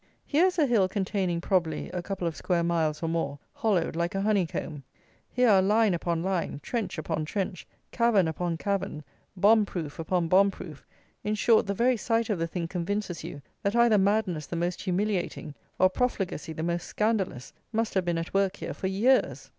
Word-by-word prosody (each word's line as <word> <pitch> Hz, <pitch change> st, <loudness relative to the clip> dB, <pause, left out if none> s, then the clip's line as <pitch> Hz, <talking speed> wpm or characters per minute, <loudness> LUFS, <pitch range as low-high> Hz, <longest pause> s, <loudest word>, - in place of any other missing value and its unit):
Here 320 Hz, +5 st, +3 dB
is 370 Hz, -, -2 dB
a 310 Hz, -, +4 dB
hill 220 Hz, -8 st, +3 dB
containing, 190 Hz, -3 st, -1 dB
probably, 170 Hz, -5 st, 0 dB
a 180 Hz, -1 st, -3 dB
couple 185 Hz, 0 st, -4 dB
of 165 Hz, -, -3 dB
square 175 Hz, -2 st, 0 dB
miles 165 Hz, -2 st, 0 dB
or -, -, 0 dB
more, 160 Hz, -4 st, -1 dB, 0.2 s
hollowed 190 Hz, -8 st, 0 dB
like 170 Hz, +2 st, -1 dB
a 195 Hz, -, 0 dB
honeycomb. 185 Hz, -7 st, -1 dB, 0.5 s
Here 250 Hz, 0 st, +2 dB
are 200 Hz, -4 st, +6 dB
line 210 Hz, +1 st, +3 dB
upon 170 Hz, -1 st, -1 dB
line, 185 Hz, -6 st, -1 dB
trench 230 Hz, -6 st, -3 dB
upon 155 Hz, 0 st, -2 dB
trench, 180 Hz, +3 st, -4 dB, 0.2 s
cavern 230 Hz, -7 st, +3 dB
upon 165 Hz, +1 st, -2 dB
cavern, 195 Hz, -6 st, -2 dB, 0.3 s
bomb 210 Hz, +3 st, +5 dB
proof 165 Hz, -7 st, -5 dB
upon 170 Hz, +1 st, 0 dB
bomb 195 Hz, +4 st, +5 dB
proof; 160 Hz, -6 st, -10 dB, 0.4 s
in 210 Hz, +1 st, 0 dB
short 220 Hz, 0 st, +3 dB
the 200 Hz, -, -1 dB
very 245 Hz, +3 st, +3 dB
sight 230 Hz, 0 st, 0 dB
of 195 Hz, -, -1 dB
the 165 Hz, -, 0 dB
thing 170 Hz, 0 st, -3 dB
convinces 180 Hz, +1 st, -3 dB
you 145 Hz, -, -8 dB, 0.2 s
that 200 Hz, +3 st, 0 dB
either 235 Hz, -3 st, +5 dB
madness 190 Hz, -6 st, +1 dB
the -, -, -5 dB
most 175 Hz, +1 st, -2 dB
humiliating, 185 Hz, -5 st, -2 dB, 0.2 s
or 185 Hz, -, +6 dB
profligacy 190 Hz, -6 st, -2 dB
the 160 Hz, 0 st, -5 dB
most 170 Hz, 0 st, -2 dB
scandalous 210 Hz, -, -1 dB, 0.2 s
must 225 Hz, 0 st, -1 dB
have 190 Hz, -, +1 dB
been 170 Hz, -1 st, 0 dB
at 165 Hz, 0 st, -4 dB
work 195 Hz, 0 st, +2 dB
here -, -, -5 dB
for 190 Hz, -, -3 dB
years. 190 Hz, -, +2 dB
185 Hz, 190 wpm, -27 LUFS, 170-210 Hz, 0.5 s, are